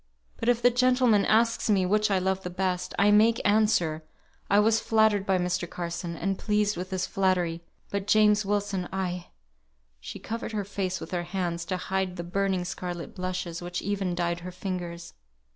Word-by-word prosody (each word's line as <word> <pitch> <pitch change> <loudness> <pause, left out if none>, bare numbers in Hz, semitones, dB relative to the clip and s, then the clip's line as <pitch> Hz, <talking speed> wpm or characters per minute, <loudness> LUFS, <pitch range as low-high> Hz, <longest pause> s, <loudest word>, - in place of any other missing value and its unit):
"But, 230 - -1
if 240 -1 +2
the 245 - +6
gentleman 250 -4 +3
asks 230 +1 +2
me 195 -3 +3
which 210 +3 +2
I 195 - +2
loved 190 +1 0
the 180 - -5
best, 180 0 -2
I 200 +1 +4
make 225 +3 +5
answer, 205 -7 +2 0.5
I 200 - +4
was 220 +2 +4
flattered 220 -3 +2
by 190 -1 +3
Mr. 180 -1 -1
Carson, 170 0 -4
and 195 +2 -2
pleased 210 -1 +1
with 180 +2 -5
his 185 -2 -1
flattery; 180 -3 0 0.3
but 200 0 -3
James 210 0 +4
Wilson 200 -2 -1
I 180 -2 -3 0.4
" - - -44
She - - -8
covered 230 0 -5
her 205 -2 -2
face 190 -2 -3
with - - -8
her 175 -1 -1
hands, 175 -1 -3
to 185 +1 -2
hide 190 0 -2
the 170 - -5
burning 190 +1 -1
scarlet 175 -2 -5
blushes, 180 -2 -4
which 175 0 -4
even 195 -2 -1
dyed 170 0 -1
her 180 +1 -7
fingers. 180 -2 -5
190 Hz, 185 wpm, -27 LUFS, 175-210 Hz, 0.5 s, the